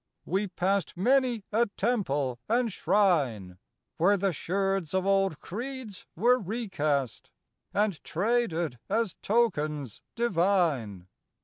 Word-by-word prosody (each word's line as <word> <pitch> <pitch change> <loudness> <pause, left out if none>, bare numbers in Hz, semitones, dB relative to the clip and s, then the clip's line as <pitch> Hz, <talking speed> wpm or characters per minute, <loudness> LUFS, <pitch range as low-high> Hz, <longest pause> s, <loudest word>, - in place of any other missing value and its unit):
We 195 +4 0
passed 185 -1 -1
Many 245 +1 +2
a 230 +3 +3
temple 145 - 0
and 235 -2 +1
shrine, 135 - +1 0.4
Where 200 +5 +4
the 195 -1 0
sherds 195 +2 -1
of 190 0 +1
old 195 -5 +2
creeds 240 -1 -7
were 245 +8 +4
recast 170 - -2 0.4
And 205 -5 0
traded 175 - 0
as 220 -1 0
tokens 150 - 0
divine. 170 - +1
195 Hz, 105 wpm, -28 LUFS, 155-220 Hz, 0.4 s, Where